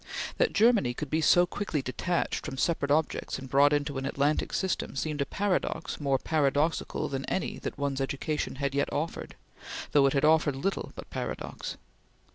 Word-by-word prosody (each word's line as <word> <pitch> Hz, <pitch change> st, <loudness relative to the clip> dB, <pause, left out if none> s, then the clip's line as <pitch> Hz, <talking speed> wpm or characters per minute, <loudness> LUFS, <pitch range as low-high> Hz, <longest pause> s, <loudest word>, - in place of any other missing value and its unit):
That -, -, +3 dB
Germany 215 Hz, -, +4 dB
could 150 Hz, +1 st, -5 dB
be 160 Hz, +1 st, +2 dB
so 175 Hz, +3 st, +6 dB
quickly 175 Hz, -6 st, -3 dB
detached 170 Hz, +7 st, -1 dB
from 135 Hz, -3 st, -5 dB
separate 145 Hz, -1 st, 0 dB
objects 150 Hz, +1 st, 0 dB
and 135 Hz, 0 st, -8 dB
brought 140 Hz, +2 st, +5 dB
into 145 Hz, -2 st, 0 dB
an 135 Hz, -, -4 dB
Atlantic 145 Hz, +2 st, 0 dB
system 190 Hz, -6 st, -1 dB
seemed 150 Hz, +1 st, -2 dB
a 140 Hz, -, 0 dB
paradox 195 Hz, -4 st, -1 dB
more 140 Hz, -2 st, +2 dB
paradoxical 150 Hz, +1 st, 0 dB
than 135 Hz, -1 st, -3 dB
any 190 Hz, -, -2 dB
that -, -, -5 dB
one's 140 Hz, -1 st, -1 dB
education 140 Hz, +3 st, -2 dB
had 140 Hz, 0 st, -2 dB
yet 140 Hz, 0 st, 0 dB
offered, 160 Hz, +3 st, -3 dB, 0.6 s
though 140 Hz, -2 st, +5 dB
it 135 Hz, -, +1 dB
had 140 Hz, +1 st, +2 dB
offered 155 Hz, -2 st, +4 dB
little 190 Hz, +9 st, -2 dB
but -, -, -8 dB
paradox. -, -, -5 dB
145 Hz, 175 wpm, -29 LUFS, 140-160 Hz, 0.6 s, so